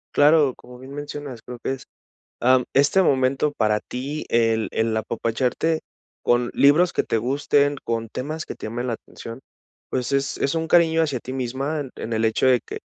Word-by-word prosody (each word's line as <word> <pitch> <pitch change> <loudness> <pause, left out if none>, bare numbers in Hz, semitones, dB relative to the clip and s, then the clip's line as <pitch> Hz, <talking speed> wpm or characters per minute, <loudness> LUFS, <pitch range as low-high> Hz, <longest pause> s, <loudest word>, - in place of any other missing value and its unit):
Claro, 145 -2 +5
como 125 0 -14
bien 130 +2 -11
mencionas, 145 -4 -6
creo 125 -1 -9
que 125 - -3
es 135 - -6 0.6
am, 125 0 +4
este 145 +8 +4
momento 135 -1 +2
para 105 -3 +1
ti, 140 +5 -5
el 115 -1 +2
el 110 0 0
apapacharte 120 +8 -1 0.4
con 120 0 +2
libros 155 +6 +5
que - - 0
te 115 - 0
gusten, 140 +4 +1
con 115 -1 -2
temas 155 +6 -4
que - - -6
te - - -9
llamen 120 +3 -3
la 120 - -1
atención, 115 +1 -9 0.5
pues 130 +1 -2
es 140 0 0
es 140 - +1
un 165 0 -1
cariño 165 -1 +4
hacia 140 -7 -1
ti 130 - -7
misma 135 +4 -2
en 135 -3 -5
en 115 - -6
el 110 0 +1
hecho 110 +3 +1
de 125 -2 +5
que - - -8
130 Hz, 190 wpm, -23 LUFS, 120-145 Hz, 0.6 s, Claro